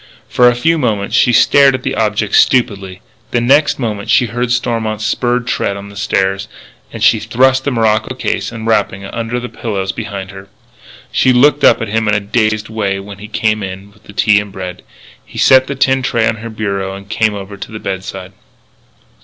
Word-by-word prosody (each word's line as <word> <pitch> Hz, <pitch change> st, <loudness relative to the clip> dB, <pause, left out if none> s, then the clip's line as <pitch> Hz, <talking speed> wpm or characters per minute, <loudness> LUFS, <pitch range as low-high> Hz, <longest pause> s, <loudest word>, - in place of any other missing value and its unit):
For 125 Hz, +1 st, +4 dB
a 120 Hz, -, 0 dB
few 165 Hz, +7 st, +1 dB
moments 105 Hz, -7 st, -1 dB
she 125 Hz, -, +4 dB
stared 135 Hz, +3 st, +5 dB
at -, -, -6 dB
the -, -, -2 dB
object 105 Hz, -1 st, -1 dB
stupidly. 100 Hz, -7 st, +2 dB, 0.3 s
The 120 Hz, -, 0 dB
next 140 Hz, +6 st, +3 dB
moment 110 Hz, -4 st, -4 dB
she 115 Hz, +3 st, +4 dB
heard 120 Hz, +2 st, -3 dB
Stormont's 115 Hz, -3 st, -1 dB
spurred 120 Hz, +3 st, 0 dB
tread 100 Hz, -4 st, -1 dB
on 100 Hz, 0 st, -9 dB
the 100 Hz, -, -13 dB
stairs; 95 Hz, -1 st, -1 dB, 0.4 s
and -, -, -5 dB
she -, -, +5 dB
thrust 130 Hz, +2 st, +2 dB
the 140 Hz, -, 0 dB
morocco 110 Hz, 0 st, 0 dB
case 130 Hz, -, -2 dB
and 115 Hz, -1 st, -7 dB
the -, -, -1 dB
wrapping 100 Hz, -2 st, 0 dB
under 115 Hz, +3 st, -4 dB
the 125 Hz, -, -6 dB
pillows 100 Hz, -6 st, -3 dB
behind 100 Hz, -2 st, -6 dB
her. 95 Hz, 0 st, -11 dB, 0.6 s
She 130 Hz, -, +3 dB
looked 140 Hz, +3 st, +4 dB
up -, -, +5 dB
at -, -, -4 dB
him 110 Hz, +1 st, 0 dB
in 105 Hz, -, +2 dB
a -, -, +2 dB
dazed 110 Hz, 0 st, -1 dB
way 100 Hz, -3 st, -2 dB
when 100 Hz, 0 st, -10 dB
he 105 Hz, -, -9 dB
came 110 Hz, 0 st, 0 dB
in 95 Hz, +1 st, -7 dB
with -, -, -25 dB
the 100 Hz, -, -13 dB
tea 105 Hz, +1 st, +3 dB
and 105 Hz, -1 st, -7 dB
bread. 90 Hz, -1 st, -7 dB, 0.4 s
He -, -, -14 dB
set 130 Hz, 0 st, +5 dB
the 140 Hz, -, -4 dB
tin 135 Hz, 0 st, +2 dB
tray 115 Hz, -3 st, +1 dB
on 110 Hz, -, -1 dB
her 115 Hz, +2 st, -7 dB
bureau 100 Hz, -3 st, -3 dB
and 100 Hz, 0 st, -11 dB
came 110 Hz, 0 st, 0 dB
over 100 Hz, 0 st, -8 dB
to 100 Hz, -, -8 dB
the 110 Hz, -, -6 dB
bedside. 95 Hz, -1 st, -6 dB
110 Hz, 210 wpm, -15 LUFS, 100-120 Hz, 0.6 s, stared